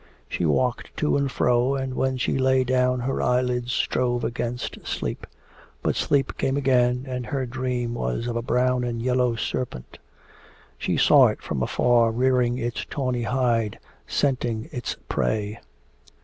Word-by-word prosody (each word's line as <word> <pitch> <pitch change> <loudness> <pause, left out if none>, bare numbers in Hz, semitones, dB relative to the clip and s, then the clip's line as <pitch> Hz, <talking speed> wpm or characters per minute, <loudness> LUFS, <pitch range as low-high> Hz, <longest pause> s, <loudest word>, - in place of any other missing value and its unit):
She 85 - -1
walked 120 - 0
to 150 - +1
and 140 -1 0
fro, 125 +3 +2
and 130 -1 -3
when 130 0 0
she 130 - 0
lay 130 0 +3
down 125 0 +1
her 135 +2 -1
eyelids 125 -1 +1
strove 120 -1 0
against 120 +1 -3
sleep. - - -3 0.6
But - - +1
sleep 135 -2 0
came 135 +1 +1
again, 125 -2 +2
and 125 -2 -4
her 135 +2 -1
dream 125 -1 -2
was 60 - -2
of 120 -1 -3
a 120 - 0
brown 125 +1 +1
and 120 -1 -2
yellow 125 0 +1
serpent. 115 - -4 0.8
She - - 0
saw - - +7
it - - -4
from 65 - -3
afar 120 - +3
rearing 125 +1 +2
its 120 -1 -3
tawny 125 -4 -2
hide, 120 -4 +1 0.3
scenting 120 -5 -1
its 125 - -4
prey. 105 0 -1
125 Hz, 150 wpm, -24 LUFS, 120-130 Hz, 0.8 s, saw